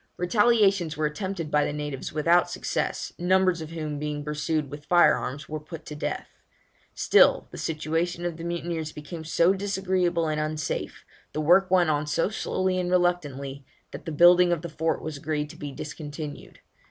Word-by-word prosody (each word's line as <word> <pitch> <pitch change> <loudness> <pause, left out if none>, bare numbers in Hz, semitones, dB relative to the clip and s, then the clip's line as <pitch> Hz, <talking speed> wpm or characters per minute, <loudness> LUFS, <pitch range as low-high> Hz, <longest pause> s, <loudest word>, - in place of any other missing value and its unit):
Retaliations 195 -4 +3
were 155 - 0
attempted 165 +1 -3
by 150 0 +3
the - - -1
natives 145 -2 -5
without 170 +3 +3
success, - - -3
numbers 185 -1 +2
of 155 - -6
whom 155 -3 -4
being 150 0 -3
pursued 150 -1 -2
with 145 0 -9
fire 175 +3 +6
arms 140 +3 -5
were 155 0 -4
put 155 +1 -10
to 150 - -7
death. 150 - -3 0.7
Still - - +4
the - - -8
situation 165 +2 -2
of 170 -2 -3
the 165 - -8
mutineers 170 -2 -3
became 155 +2 -8
so 170 +3 +3
disagreeable 190 -4 0
and 155 0 -1
unsafe, 155 0 -3 0.3
the 155 - -1
work 180 +5 +5
went 180 -3 +4
on 150 0 -1
so 165 +5 +1
slowly 185 -3 -1
and 180 -1 -1
reluctantly, 145 -7 0 0.3
that - - -9
the 160 - -4
building 175 +3 +6
of 170 -1 -1
the 170 - -5
fort 160 +1 -1
was 155 -2 -5
agreed 150 0 -3
to - - -13
be 145 -1 -6
discontinued. 150 +1 -8
160 Hz, 175 wpm, -26 LUFS, 150-175 Hz, 0.7 s, fire